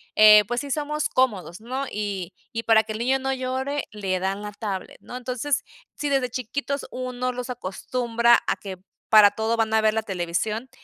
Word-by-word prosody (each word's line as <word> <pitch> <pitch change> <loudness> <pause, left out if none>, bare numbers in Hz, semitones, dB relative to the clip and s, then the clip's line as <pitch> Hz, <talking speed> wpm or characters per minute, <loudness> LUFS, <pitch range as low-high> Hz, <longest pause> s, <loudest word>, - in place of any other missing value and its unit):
eh, 210 0 +9
pues 240 +2 -1
sí 285 -1 -6
somos 300 +1 -1
cómodos, 210 -7 0
¿no? 260 +4 -3
Y, 195 -3 -4 0.2
y 230 0 -3
para 225 -1 +5
que 215 - -6
el - - -4
niño 260 +3 +2
no 265 0 -1
llore, 265 +2 -2
le 195 -3 -2
dan 195 +2 -2
la 210 0 -6
tablet, 200 -3 -5
¿no? - - -10
Entonces, 255 +3 -2 0.3
sí, 295 - -3
desde 270 -3 +1
chiquitos 275 +3 -3
uno 255 0 -3
los 250 0 -5
acostumbra 235 +2 +1
a - - +2
que, 190 -2 -8 0.3
para 210 -2 +8
todo 220 +2 -1
van 220 -1 +1
a 220 - +4
ver 215 0 +3
la 220 - 0
televisión, 205 +5 -2
230 Hz, 195 wpm, -24 LUFS, 210-255 Hz, 0.3 s, eh